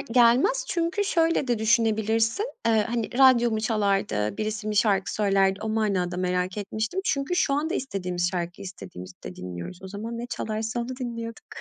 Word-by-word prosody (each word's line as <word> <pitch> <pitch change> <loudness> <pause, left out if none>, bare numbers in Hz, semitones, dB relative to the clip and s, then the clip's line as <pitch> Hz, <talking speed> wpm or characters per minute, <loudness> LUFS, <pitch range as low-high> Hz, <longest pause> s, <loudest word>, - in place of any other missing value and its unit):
gelmez 255 - +4
çünkü 345 +3 0
şöyle 330 -6 +2
de 240 - +1
düşünebilirsin. 225 - +2 0.2
Eee, 220 -2 +3
hani, 235 -2 -2
radyo 250 -3 +6
mu 220 -1 -1
çalardı, 195 - 0
birisi 215 0 -3
mi 210 - -2
şarkı 200 -3 +2
söylerdi 195 -1 +2
o 220 - -2
manada 200 -5 0
merak 180 +1 -1
etmiştim 220 - -2
çünkü 280 +5 0
şu 280 -5 +2
anda 320 +5 -1
istediğimiz 180 -7 -2
şarkıyı 175 -1 -4
istediğimizde 90 - -9
dinliyoruz. 90 - -7
O 190 - -7
zaman 225 +4 -5
ne 240 - -4
çalarsa 220 0 -3
onu 235 - -4
dinliyorduk. 230 -3 -6
220 Hz, 160 wpm, -26 LUFS, 190-240 Hz, 0.2 s, radyo